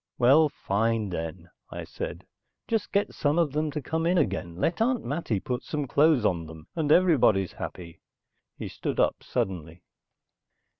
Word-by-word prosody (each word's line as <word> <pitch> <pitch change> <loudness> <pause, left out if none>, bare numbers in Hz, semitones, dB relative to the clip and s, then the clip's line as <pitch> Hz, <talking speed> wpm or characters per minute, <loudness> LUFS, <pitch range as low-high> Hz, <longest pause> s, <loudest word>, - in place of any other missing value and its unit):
"Well, 140 +6 +5
fine, 110 -3 0
then," 85 0 -5 0.2
I - - -6
said. - - -6 0.4
"Just 225 -2 -1
get 200 +1 +1
some 145 +2 +1
of 165 -4 +2
them 155 +2 0
to 150 -1 -4
come 160 +4 -1
in 180 +1 +3
again, 95 - -1
let 165 - -1
Aunt 245 +1 +1
Mattie 130 - -1
put 125 +5 -3
some 150 -2 -3
clothes 145 -3 +3
on 85 -5 0
them, 80 -1 -11
and 155 -3 0
everybody's 140 - +4
happy." 85 -2 -8 0.6
He - - -5
stood - - -4
up - - +2
suddenly. 85 -2 -3
125 Hz, 160 wpm, -27 LUFS, -, 0.6 s, Well